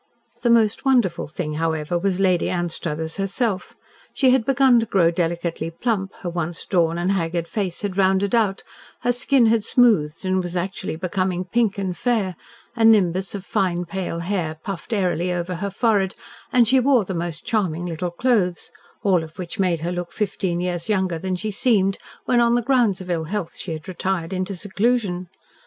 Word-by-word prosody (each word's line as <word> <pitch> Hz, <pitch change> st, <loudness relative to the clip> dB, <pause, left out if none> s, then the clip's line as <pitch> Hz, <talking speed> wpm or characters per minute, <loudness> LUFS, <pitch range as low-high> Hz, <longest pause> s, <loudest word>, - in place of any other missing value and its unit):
The 240 Hz, -, +1 dB
most 225 Hz, -2 st, +3 dB
wonderful 245 Hz, -11 st, +2 dB
thing, 155 Hz, 0 st, -4 dB
however, 160 Hz, 0 st, -1 dB
was 185 Hz, +1 st, 0 dB
Lady 185 Hz, -3 st, +2 dB
Anstruthers 165 Hz, -2 st, -3 dB
herself. 195 Hz, +1 st, -1 dB, 0.4 s
She 260 Hz, -2 st, +4 dB
had 255 Hz, -3 st, +3 dB
begun 265 Hz, -2 st, +5 dB
to 225 Hz, -, -2 dB
grow 170 Hz, -5 st, +3 dB
delicately 170 Hz, -1 st, -2 dB
plump, 195 Hz, +2 st, -2 dB
her 180 Hz, -, -3 dB
once 170 Hz, -1 st, -3 dB
drawn 170 Hz, -3 st, +1 dB
and 175 Hz, +2 st, 0 dB
haggard 170 Hz, -3 st, -1 dB
face 195 Hz, -2 st, -3 dB
had 200 Hz, -2 st, -3 dB
rounded 195 Hz, +1 st, +2 dB
out, 215 Hz, -5 st, +1 dB, 0.4 s
her 245 Hz, -, +2 dB
skin 245 Hz, +1 st, +3 dB
had 225 Hz, -1 st, +3 dB
smoothed, 200 Hz, -10 st, +3 dB
and 185 Hz, 0 st, +1 dB
was 175 Hz, 0 st, -5 dB
actually 185 Hz, 0 st, -3 dB
becoming 185 Hz, +1 st, -1 dB
pink 215 Hz, +1 st, +1 dB
and 190 Hz, -3 st, -2 dB
fair, 205 Hz, -3 st, 0 dB, 0.4 s
a 230 Hz, -, 0 dB
nimbus 195 Hz, -4 st, +4 dB
of 195 Hz, -1 st, -7 dB
pale 175 Hz, -2 st, 0 dB
fine 180 Hz, -2 st, -3 dB
hair 170 Hz, -4 st, -2 dB
puffed 195 Hz, 0 st, -6 dB
airily 180 Hz, -4 st, 0 dB
over 175 Hz, +1 st, -2 dB
her 200 Hz, +3 st, -3 dB
forehead, 200 Hz, -2 st, +1 dB, 0.4 s
and 245 Hz, -2 st, +4 dB
she 260 Hz, +3 st, +5 dB
wore 255 Hz, -4 st, +3 dB
the 190 Hz, -, -4 dB
most 170 Hz, -2 st, -4 dB
charming 175 Hz, -6 st, 0 dB
little 175 Hz, +1 st, -3 dB
clothes, 180 Hz, -2 st, 0 dB, 0.3 s
all 185 Hz, -5 st, +3 dB
of 160 Hz, +1 st, -12 dB
which 185 Hz, +3 st, -6 dB
made 175 Hz, -4 st, +1 dB
her 170 Hz, +2 st, -2 dB
look 175 Hz, -1 st, -4 dB
fifteen 190 Hz, -4 st, -2 dB
years 175 Hz, +1 st, -2 dB
younger 190 Hz, -5 st, 0 dB
than 185 Hz, +2 st, -2 dB
she 215 Hz, +4 st, -3 dB
had -, -, -5 dB
seemed 195 Hz, -6 st, +2 dB, 0.3 s
when, 245 Hz, -, +3 dB
on 235 Hz, 0 st, +4 dB
the 240 Hz, -, +1 dB
grounds 235 Hz, -7 st, +2 dB
of 185 Hz, -, -9 dB
ill 165 Hz, -2 st, -1 dB
health, 195 Hz, 0 st, -4 dB
she 180 Hz, -, -6 dB
had 155 Hz, +4 st, -8 dB
retired 185 Hz, -1 st, -2 dB
into 185 Hz, +1 st, -2 dB
seclusion. 200 Hz, -1 st, -1 dB
185 Hz, 185 wpm, -22 LUFS, 175-215 Hz, 0.4 s, begun